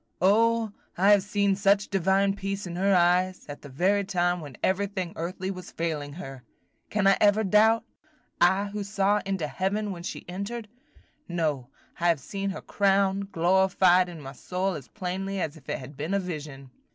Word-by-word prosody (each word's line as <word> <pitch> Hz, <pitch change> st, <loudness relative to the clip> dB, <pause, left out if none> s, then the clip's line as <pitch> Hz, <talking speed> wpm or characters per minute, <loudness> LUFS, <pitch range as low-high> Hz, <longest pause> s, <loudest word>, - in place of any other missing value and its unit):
O, 225 Hz, +3 st, +3 dB, 0.3 s
I 195 Hz, +3 st, +5 dB
have 205 Hz, -1 st, +6 dB
seen 200 Hz, 0 st, +1 dB
such 200 Hz, +1 st, +2 dB
divine 195 Hz, +1 st, +2 dB
peace 195 Hz, 0 st, -4 dB
in 175 Hz, -1 st, -6 dB
her 195 Hz, +2 st, +2 dB
eyes, 180 Hz, +1 st, +2 dB
at 145 Hz, -1 st, -8 dB
the 145 Hz, -, -11 dB
very 190 Hz, +9 st, +1 dB
time 175 Hz, -2 st, 0 dB
when 145 Hz, -5 st, -10 dB
everything 190 Hz, -2 st, -1 dB
earthly 185 Hz, +3 st, -4 dB
was 185 Hz, -2 st, -8 dB
failing 150 Hz, -4 st, -3 dB
her! 135 Hz, -7 st, -9 dB, 0.5 s
Can 210 Hz, -2 st, 0 dB
I 195 Hz, 0 st, +5 dB
ever 210 Hz, +1 st, +4 dB
doubt? 220 Hz, +3 st, +4 dB, 0.6 s
I 190 Hz, +3 st, +3 dB
who 205 Hz, 0 st, -4 dB
saw 200 Hz, +1 st, +1 dB
into 190 Hz, -5 st, -1 dB
heaven 200 Hz, +5 st, -2 dB
when 175 Hz, -2 st, -7 dB
she 175 Hz, -, -6 dB
entered? 200 Hz, +5 st, -5 dB, 0.6 s
No, 155 Hz, -7 st, -2 dB, 0.3 s
I 175 Hz, -, +1 dB
have 165 Hz, -3 st, +3 dB
seen 195 Hz, +8 st, -4 dB
her 195 Hz, -, -5 dB
crowned, 195 Hz, 0 st, +1 dB
glorified, 185 Hz, +1 st, +3 dB
in 170 Hz, -2 st, -9 dB
my 135 Hz, -1 st, -8 dB
soul 185 Hz, +7 st, -2 dB
as 145 Hz, -6 st, -8 dB
plainly 195 Hz, 0 st, -4 dB
as 155 Hz, -3 st, -2 dB
if 145 Hz, -5 st, -15 dB
it -, -, -1 dB
had 135 Hz, +2 st, -10 dB
been 155 Hz, +7 st, -2 dB
a -, -, +2 dB
vision." 150 Hz, -7 st, -7 dB
190 Hz, 180 wpm, -27 LUFS, 170-200 Hz, 0.6 s, have